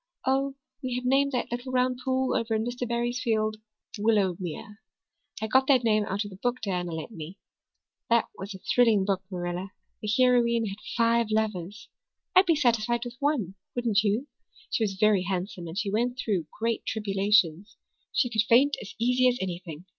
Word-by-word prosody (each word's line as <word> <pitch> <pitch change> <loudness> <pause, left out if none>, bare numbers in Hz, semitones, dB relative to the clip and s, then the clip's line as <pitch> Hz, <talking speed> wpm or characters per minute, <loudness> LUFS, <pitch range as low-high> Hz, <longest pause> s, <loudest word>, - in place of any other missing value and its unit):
Oh, 270 +1 +1 0.3
we 255 -2 -3
have 250 0 -3
named 275 +2 +3
that 250 - -2
little 245 +2 -4
round 255 0 +1
pool 260 0 0
over 225 -1 0
in 220 +1 0
Mr. 245 0 -3
Barry's 240 +1 -1
field 215 -2 0 0.4
Willowmere. 200 -2 0 0.6
I - - -2
got 260 +4 +3
that 260 -3 +4
name 215 -2 +3
out 205 +1 -2
of 205 - -8
the 190 - -11
book 245 +4 0
Diana 180 -6 -2
lent 160 +6 -5
me. 170 0 -8 0.7
That 235 0 +4
was 195 +1 -7
a - - -9
thrilling 225 -6 +4
book, 195 -2 0
Marilla. 180 +1 -4 0.3
The 215 - -5
heroine 240 -2 +4
had 200 0 -5 0.2
five 230 0 +3
lovers. 215 -1 -2 0.5
I'd 370 0 +7
be 330 - +4
satisfied 240 -3 +1
with 245 +1 -8
one, 275 - 0 0.2
wouldn't 230 -4 +2
you? 215 +5 0 0.5
She 225 - +1
was 205 -3 0
very 210 -1 +3
handsome 180 -1 -3
and 165 +3 -7
she 205 -3 -1
went 240 +4 0
through 195 -10 -1
great 230 0 -1
tribulations. 200 -3 +1 0.4
She 265 - +2
could 220 -3 +2
faint 270 +5 +5
as 200 - -9
easy 250 +2 +3
as 245 - -1
anything. 175 -3 -5
220 Hz, 180 wpm, -27 LUFS, 195-245 Hz, 0.7 s, I'd